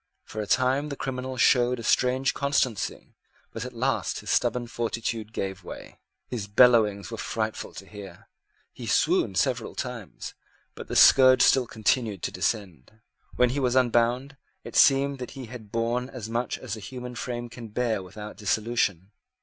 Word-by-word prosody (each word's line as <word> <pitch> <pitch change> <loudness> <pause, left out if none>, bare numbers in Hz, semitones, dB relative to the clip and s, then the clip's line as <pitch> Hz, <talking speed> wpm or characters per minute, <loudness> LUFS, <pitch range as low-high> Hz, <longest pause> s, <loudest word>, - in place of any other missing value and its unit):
For 110 - -6
a 105 - -5
time 130 +3 +2
the 140 - -4
criminal 130 -1 -4
showed 125 0 +3
a - - -7
strange 130 +3 +2
constancy: 140 -6 -1 0.4
but - - -5
at - - -7
last - - -1
his - - -4
stubborn 125 -1 +1
fortitude 115 -2 -3
gave 95 -3 -4
way. - - -10 0.3
His 110 -5 -4
bellowings 105 -2 +4
were 115 - -6
frightful 110 -1 -3
to 95 - -9
hear. 95 -2 -11 0.5
He - - -8
swooned 95 - +2
several 125 +1 0
times; 125 -6 -6 0.4
but - - -9
the - - -5
scourge 130 -1 +7
still 130 -3 +4
continued 110 -3 0
to - - -2
descend. 100 - -3 0.4
When 125 -1 +3
he 140 - -1
was 125 -2 +1
unbound, 125 +2 +2 0.3
it - - -9
seemed 140 0 +4
that 125 +2 -7
he 130 - -6
had 110 -3 -11
borne 120 +2 -1
as 120 -5 -7
much 115 +1 -2
as - - -6
the 110 - -5
human 125 +4 -7
frame 120 0 -4
can 120 -1 -10
bear 110 -1 -1
without 105 +3 -9
dissolution. 105 -3 -1
120 Hz, 165 wpm, -26 LUFS, 105-125 Hz, 0.5 s, scourge